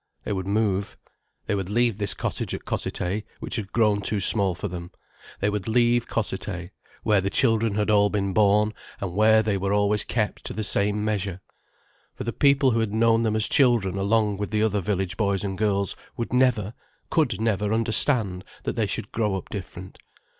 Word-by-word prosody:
They - - -3
would 95 -1 -4
move. 100 -1 -1 0.5
They - - -1
would 95 -2 -2
leave 115 -1 +1
this 100 -1 +2
cottage - - -2
at - - -9
Cossethay 95 +4 -2 0.2
which - - -3
had 105 -2 -5
grown 105 -3 +2
too 105 +1 0
small 95 -1 +4
for - - -4
them; 85 0 -7 0.5
they 100 - +2
would 105 -2 -2
leave 120 +1 +2
Cossethay, 95 -4 -4 0.3
where 105 -2 +3
the 95 - -1
children 115 -2 +2
had 105 +1 0
all 105 -1 +4
been 100 -2 -1
born, 105 +1 +3 0.3
and 95 -3 -4
where 110 +2 +4
they 100 -2 -1
were 100 +1 -1
always 105 +1 +1
kept 110 -3 -2
to - - -4
the 110 - -3
same 105 +1 +1
measure. 100 -4 -2 0.8
For - - -6
the 115 - -3
people 140 -2 +3
who 115 - +1
had 110 -2 -1
known 115 0 +3
them 110 -2 0
as 110 -1 +4
children 120 -9 +3
along 105 +1 +1
with 105 0 -4
the 110 0 0
other 105 -2 +1
village 95 -1 -2
boys 100 -3 0
and 95 -1 -3
girls 100 -1 0 0.2
would 115 0 -4
never, 125 -5 +2 0.4
could 150 -9 +1
never 105 -2 0
understand 110 -4 +2 0.2
that - - -3
they - - 0
should - - -4
grow 105 -3 -1
up 95 - -6
different. 95 -2 -8
105 Hz, 195 wpm, -24 LUFS, 100-110 Hz, 0.8 s, small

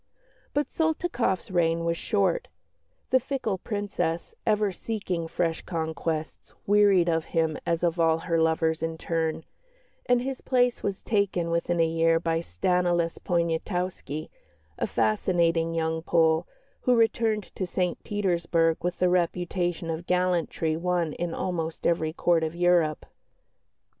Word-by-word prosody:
But 290 0 +1
Soltykoff's 315 - -1
reign 165 -2 +1
was 170 0 +1
short; 195 0 0 0.6
the 260 - +6
fickle 250 -7 -2
Princess, 200 -6 -3
ever 210 -2 +2
seeking 185 -5 -3
fresh 165 0 -1
conquests, 160 -1 -4
wearied 200 -3 +5
of 165 -1 +1
him 160 -1 +2
as 170 0 0
of 170 0 +1
all 165 -1 +4
her 165 0 0
lovers 160 0 +1
in 165 0 -2
turn, 160 -1 -2 0.6
and 245 0 +4
his 265 0 -4
place 250 -2 +2
was 200 -1 -3
taken 195 -5 0
within 170 +1 0
a 165 - +5
year 165 0 +2
by 165 -1 0
Stanislas 175 - 0
Poniatowski, 170 -2 -2 0.5
a - - 0
fascinating 165 - +1
young 160 0 -1
Pole, 160 0 +2 0.3
who 250 - +3
returned 225 -2 +1
to 185 - -2
St 180 0 -2
Petersburg 170 -5 +1
with 180 0 -2
a - - +5
reputation 175 -1 0
of 165 +2 -5
gallantry 180 -3 +1
won 170 -2 0
in 175 -1 -3
almost 165 -3 -3
every 160 -2 +1
Court 170 0 +2
of 160 +1 -3
Europe. 175 -3 +2
170 Hz, 135 wpm, -27 LUFS, 165-185 Hz, 0.6 s, the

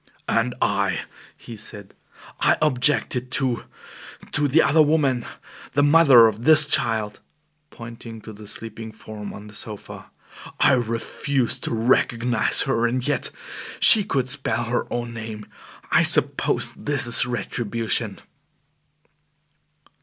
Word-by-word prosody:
"And 120 +2 0
I," - - 0 0.4
he 115 - -11
said, 105 -2 -10 0.5
"I - - +3
objected 130 -3 +1
to 130 -4 -1 0.7
to 145 0 +1
the 150 +4 +3
other 155 +3 +3
woman, 145 -5 +1 0.5
the 145 - +2
mother 145 -6 +6
of 110 +1 -1
this 155 0 +7
child" 110 -6 0 0.5
(pointing 115 -2 -10
to 110 - -11
the 105 0 -12
sleeping 110 +1 -7
form 110 -1 -9
on 100 - -11
the 105 - -13
sofa); 105 0 -9 0.5
"I - - +4
refused 120 +2 -2
to - - -3
recognize 115 -1 +2
her. 120 -4 0
And 125 +2 -2
yet 145 - -1 0.5
she 215 -3 +7
could 130 -8 -2
spell 130 -3 0
her 120 +1 -3
own 120 -1 -4
name. 110 -2 -8 0.5
I - - +4
suppose - - +1
this 145 -2 -1
is 120 0 +3
retribution." 115 -1 -2
120 Hz, 125 wpm, -22 LUFS, 110-135 Hz, 0.7 s, this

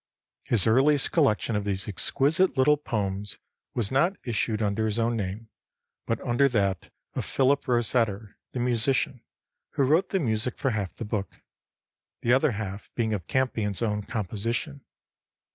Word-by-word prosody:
His 115 -5 +3
earliest 135 +5 +3
collection 120 -8 +2
of 105 - 0
these 100 +1 -1
exquisite 145 - +1
little 150 +3 +5
poems 105 -8 -3 0.4
was 115 -5 -1
not 170 +9 +2
issued 110 -2 -1
under 110 +1 0
his 110 0 -2
own 115 0 +1
name, 105 +2 -4 0.6
but 115 - 0
under 125 +3 +2
that 100 -7 -1 0.2
of - - -2
Philip 140 +2 +1
Rosetter 115 -4 0 0.2
the 125 - -3
musician, 125 +1 +1 0.5
who 140 - +2
wrote 155 +7 +3
the 195 - +1
music 115 -4 -1
for 135 - 0
half 100 -5 -3
the 115 - -6
book; 105 -3 -4 0.8
the 120 - +3
other 135 0 +3
half 100 -1 -6
being 110 -2 0
of 90 -5 -4
Campion's 115 -6 0
own 105 -2 0
composition. 115 - -3
115 Hz, 150 wpm, -27 LUFS, 105-130 Hz, 0.8 s, little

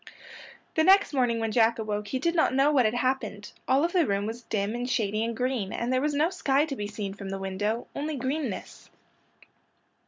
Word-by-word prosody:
The 315 - +2
next 385 0 +5
morning 245 -4 +1
when 225 -1 -1
Jack 230 +1 +3
awoke 210 -2 -3
he 260 - -2
did 335 +6 0
not 320 -6 +2
know 275 +2 +4
what 265 -5 +4
had 215 +2 +1
happened. 245 -5 -2 0.2
All 265 +3 +3
of 345 - -3
the 350 -5 +3
room 200 0 0
was 225 +2 -5
dim 210 -2 -2
and 245 +1 -3
shady 215 -3 0
and 230 0 -3
green, 250 -6 -1
and 235 +3 -2
there 255 - +2
was 295 0 0
no 310 +5 +2
sky 290 -5 +2
to 290 -3 -5
be 205 -4 -4
seen 205 -2 -5
from 195 -1 -8
the 195 - -3
window,—only 215 +10 -3
greenness. 265 -3 -4
240 Hz, 210 wpm, -27 LUFS, 210-275 Hz, 0.2 s, next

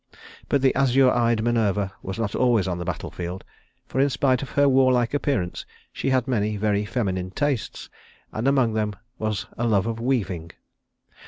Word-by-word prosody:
But 140 -1 +2
the 135 - +4
azure 135 -1 +4
eyed 115 -2 +2
Minerva 105 -5 +1
was 95 +2 -5
not 115 -3 -2
always 120 -6 +2
on 90 -1 -2
the 85 - -4
battle - - -4
field, 90 +1 -6 0.4
for 130 - -1
in 140 - +3
spite 130 -2 +1
of 135 - -6
her 145 0 +3
warlike 130 -2 +3
appearance 135 -11 -1 0.3
she - - -2
had 130 -1 +1
many 105 -4 0
very 105 0 0
feminine 95 -6 -2
tastes, 135 +4 -2 0.4
and 110 +5 -2
among 130 -5 +3
them 105 -1 -1 0.2
was 110 -3 -2
a 120 - +1
love 105 -3 +2
of 115 0 -3
weaving. 95 -10 -2
115 Hz, 175 wpm, -24 LUFS, 100-130 Hz, 0.4 s, the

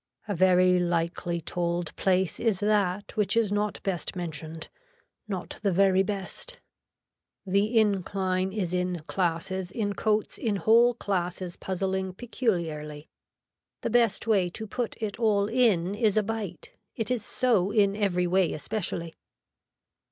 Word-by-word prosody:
A 205 - -1
very 180 0 +4
likely 170 0 -1
told 170 0 -2
place 190 -2 +1
is 220 -5 +1
that 205 -2 0
which 210 +2 +1
is 220 -3 +2
not 205 0 -1
best 190 -2 -2
mentioned, 160 -2 -4 0.6
not 190 -4 -5
the 200 -2 +1
very 190 +1 +4
best. 200 - -4 0.9
The 200 +4 +1
incline 190 -2 0
is 190 -4 -2
in 180 -2 -1
classes 175 +2 -2
in 205 -2 -1
coats 215 0 0
in 220 -4 0
whole 230 +4 +5
classes 180 -4 -2
puzzling 190 0 -2
peculiarly. 165 - -3 0.7
The - - -2
best 230 -3 +2
way 200 -6 +2
to 220 +5 -6
put 235 +2 -3
it 215 -1 -4
all 210 -3 +3
in 210 -6 +2
is 215 -1 +1
a 215 - +4
bite, 205 -6 -5 0.2
it 225 +1 -2
is 245 -4 0
so 225 -7 +1
in 200 -2 +3
every 190 -4 +1
way 185 0 +2
especially. 170 -1 -4
190 Hz, 135 wpm, -27 LUFS, 180-215 Hz, 0.9 s, whole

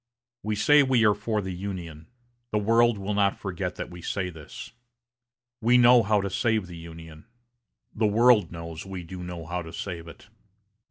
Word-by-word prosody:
We 105 0 -2
say 145 +8 +5
we 130 -4 +3
are 105 - +5
for 105 0 -2
the 95 0 -4
Union. 90 -4 -7 0.4
The 105 - +1
world 115 +2 +3
will 100 +1 -3
not 100 -1 +2
forget 90 -1 -4
that - - -6
we 90 0 -10
say 90 +1 -3
this. 80 -3 -10 0.9
We 120 +3 +4
know 120 0 +7
how 105 -1 +2
to 100 - -3
save 110 -2 0
the 90 -1 -10
Union. 80 -1 -11 0.7
The 110 -1 +1
world 110 -3 +4
knows 85 -1 -7
we 95 -2 -7
do 90 +2 -8
know 90 -2 -7
how 90 +2 -3
to 80 -1 -9
save 85 -2 -6
it. 80 - -13
95 Hz, 180 wpm, -26 LUFS, 85-110 Hz, 0.9 s, know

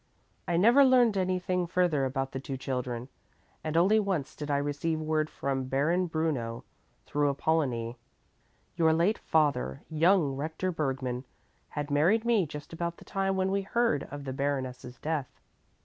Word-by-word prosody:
I 170 - +1
never 235 +10 +6
learned 250 -5 +5
anything 185 -1 0
further 170 -6 +2
about 135 0 -2
the 135 - -4
two 135 0 -5
children, 125 -2 -3 0.6
and 155 +1 -1
only 195 +6 +5
once 190 -9 -2
did 150 0 -6
I 140 - +2
receive 145 +3 -1
word 155 0 0
from 135 -1 -2
Baron 155 +8 +1
Bruno 150 -8 -2 0.4
through 145 0 +1
Apollonie. 130 -5 0 0.8
Your 160 -1 +4
late 175 +7 +2
father, 140 - +1
young 160 -2 +3
Rector 160 +6 -2
Bergmann, 135 -5 -2 0.4
had 145 -1 -4
married 180 +11 +3
me 225 -8 +3
just 150 +1 -9
about 170 +1 -3
the - - -15
time 195 0 -1
when 190 0 +1
we 200 0 +1
heard 215 - 0
of 145 0 -7
the 135 -1 -4
Baroness's 130 -3 -3
death. 150 -1 -3
155 Hz, 155 wpm, -29 LUFS, 135-180 Hz, 0.8 s, never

